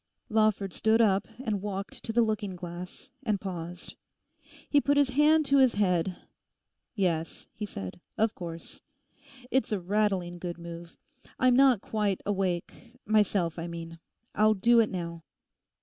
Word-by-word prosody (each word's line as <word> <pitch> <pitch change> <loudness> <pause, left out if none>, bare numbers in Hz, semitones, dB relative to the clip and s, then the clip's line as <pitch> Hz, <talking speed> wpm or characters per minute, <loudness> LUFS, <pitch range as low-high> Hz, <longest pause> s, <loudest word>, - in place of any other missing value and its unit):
Lawford 215 -4 +2
stood 220 +1 +2
up 200 -3 +3 0.2
and 210 -3 -1
walked 200 -1 -5
to 225 - -3
the 235 +1 +4
looking 215 -3 -2
glass, 180 +8 -8
and 215 -6 0
paused. 175 -2 -6 0.7
He 290 - +4
put 285 +1 +2
his 280 -2 +3
hand 305 +3 +4
to 275 0 +4
his 260 -3 +4
head, 180 -3 +1 0.8
'Yes,' 170 -5 -1
he 210 0 -5
said, 95 - -7 0.2
'of 220 0 +2
course; 170 -4 -8 0.7
it's 260 -2 +1
a 210 - 0
rattling 185 -2 0
good 175 -1 -5
move. 170 0 -9 0.4
I'm 255 -1 +4
not 260 -5 +5
quite 210 -3 -1
awake; 195 +4 -3
myself, 200 -6 +2
I 165 - -4
mean. 165 -1 -7 0.3
I'll 215 0 +4
do 235 +4 +4
it 225 - +3
now. 170 -3 -5
200 Hz, 150 wpm, -28 LUFS, 175-225 Hz, 0.8 s, not